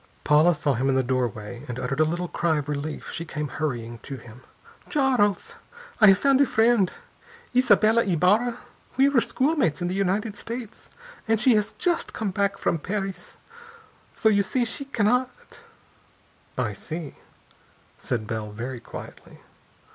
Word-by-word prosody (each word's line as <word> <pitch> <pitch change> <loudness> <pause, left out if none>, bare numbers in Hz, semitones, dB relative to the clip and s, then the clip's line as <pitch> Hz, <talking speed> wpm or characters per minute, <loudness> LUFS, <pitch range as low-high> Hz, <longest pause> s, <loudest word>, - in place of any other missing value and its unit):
Paula 155 +3 +5
saw 150 -2 0
him 130 +3 0
in 135 - +2
the 130 - +2
doorway, 120 -2 -3
and 120 - -5
uttered 130 +3 -3
a - - +6
little 175 +3 -2
cry 165 -2 0
of 145 -1 -3
relief. 150 +1 -4
She 165 - -4
came 150 -3 -4
hurrying 120 -6 -4
to 135 +4 -7
him. 120 0 -14 0.5
"Charles! 255 -8 +1 0.5
I 215 - +8
have 195 -1 +7
found 275 +4 +3
a 280 - +4
friend! 225 -4 +3 0.6
Isabella 230 -2 +4
Ybarra. 205 +7 +2 0.4
We 270 +1 +5
were 270 -4 +3
schoolmates 265 - +1
in 175 0 -2
the - - -2
United 200 +2 -1
States 235 0 -8 0.4
and 225 -1 +2
she 250 +2 +5
has 210 0 +1
just 350 -2 -1
come 215 -3 -2
back 200 +1 0
from 165 - 0
Paris! 195 +2 -5 0.8
So 220 - +1
you 205 -2 +4
see, 240 +5 0
she 255 +5 -3
cannot 250 0 +1 0.8
" - - -35
"I - - -1
see," 160 -3 -7 0.8
said 115 -3 -3
Bell 110 -1 -4
very 120 +4 -6
quietly. - - -11
185 Hz, 160 wpm, -25 LUFS, 140-225 Hz, 0.8 s, I